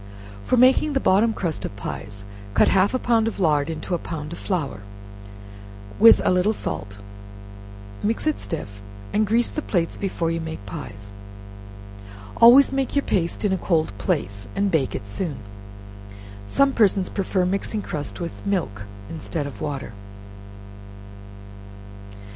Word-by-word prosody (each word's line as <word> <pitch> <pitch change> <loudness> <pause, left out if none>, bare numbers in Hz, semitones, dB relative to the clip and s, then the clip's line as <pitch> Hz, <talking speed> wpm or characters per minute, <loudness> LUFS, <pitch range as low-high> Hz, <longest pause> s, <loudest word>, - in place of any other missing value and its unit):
For 250 - +1
making 260 +4 +5
the 270 - +2
bottom 220 0 +3
crust 170 -7 -3
of - - -5
pies, 100 0 -7 0.3
cut - - +5
half 195 +5 +3
a - - +3
pound 230 -3 +2
of 225 - -4
lard 150 -4 +2
into 165 +3 -4
a 175 - 0
pound 155 -1 -6
of - - -8
flour, 150 - -3 1.2
with 230 - +8
a - - +4
little 180 +4 +2
salt; 100 - -5 1.0
mix 225 +6 -1
it 310 -1 0
stiff, 100 - -6 0.3
and 215 0 +2
grease 235 +3 +2
the 305 - -3
plates 175 - -1
before 175 -4 -2
you 165 0 -2
make 160 -10 -7
pies; 100 -1 -8 1.2
always 260 +4 +8
make 270 0 -1
your 280 - +1
paste 175 +2 0
in 195 - +2
a 190 - -1
cold 160 - 0
place, 100 0 -2
and 200 0 +1
bake 140 -6 +1
it - - -5
soon. 145 - -4 1.1
Some 275 - +3
persons 195 -5 +3
prefer 190 -2 -1
mixing 200 +3 -2
crust 150 -3 -5
with 170 -1 -3
milk 105 - -2 0.2
instead 160 -1 -4
of 130 -8 -8
water. 135 -6 -4
175 Hz, 150 wpm, -23 LUFS, 145-215 Hz, 1.2 s, with